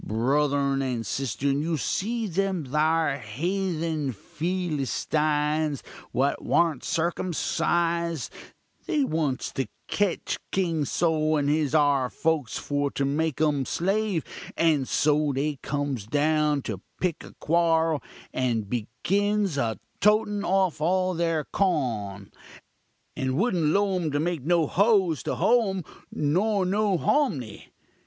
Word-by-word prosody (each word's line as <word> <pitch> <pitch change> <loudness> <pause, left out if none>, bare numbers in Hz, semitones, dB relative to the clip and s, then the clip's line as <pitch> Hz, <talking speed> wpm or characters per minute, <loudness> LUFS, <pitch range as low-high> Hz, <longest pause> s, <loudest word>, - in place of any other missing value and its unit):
Bruthurn 140 +4 +1
and 125 -4 -2
sisturn, 135 +2 -1
you 160 +1 -1
see 225 - -1
them 190 -3 -1
thar 150 +1 +1
hethun 160 - -2
Fillystines, 155 - -1 0.3
what 135 +3 0
warn't 165 -6 +1
circumcised, 170 -1 0 0.5
they 305 -5 +2
wants 155 - -1
to 135 -3 -2 0.2
ketch 205 -4 -1
King 165 -6 0
Sol 155 0 +1
and 145 -1 0
his 150 0 +1
'ar 140 -4 +3
folks 160 -5 -1
for 145 0 -1
to 140 - -1
make 150 +1 -1
um 150 -3 +2
slave; 195 +3 0 0.3
and 155 -5 +2
so, 150 -1 +2
they 145 +1 -1
cums 140 -7 -3
down 150 +1 +2
to 100 -5 -5 0.2
pick 180 -4 -1
a - - -13
quorl, 165 -2 +2 0.3
and 120 -5 0
begins 195 - 0
a 115 -6 -1 0.2
totin 210 -1 +3
off 190 -4 +1
all 185 +3 +2
their 165 -2 0
cawn, 115 - -1 0.8
and 130 0 -1
wouldn't 185 -5 +1
'low 195 +4 +2
um 170 -3 -1
to 145 0 -1
make 170 -1 -1
no 170 +1 +3
hoes 190 - +2
to - - -2
hoe 230 -3 +3
um, 190 -2 -3 0.3
nor 190 +7 +1
no 200 0 +1
homnee. 195 - 0
155 Hz, 125 wpm, -26 LUFS, 140-180 Hz, 0.8 s, ar